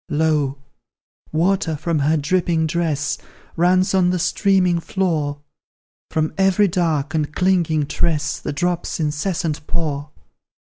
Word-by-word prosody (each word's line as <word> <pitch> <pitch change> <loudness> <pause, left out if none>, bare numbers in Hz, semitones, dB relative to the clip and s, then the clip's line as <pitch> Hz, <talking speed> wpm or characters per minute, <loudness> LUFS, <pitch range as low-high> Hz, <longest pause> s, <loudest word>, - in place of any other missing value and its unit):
Lo! 150 -3 +1 0.7
water 165 0 +1
from 160 +1 -1
her 150 +3 +2
dripping 165 +1 +1
dress 155 -2 -1 0.4
Runs 185 +3 +3
on 185 -2 +3
the 180 - +1
streaming 180 0 +2
floor; 160 -6 -1 0.7
From 155 0 -1
every 195 +2 +4
dark 165 -5 0
and 155 -2 -1
clinging 170 -5 +2
tress 150 -1 -1
The - - -4
drops 175 +4 -2
incessant 155 0 -2
pour. 150 -3 -2
160 Hz, 120 wpm, -21 LUFS, 150-180 Hz, 0.7 s, every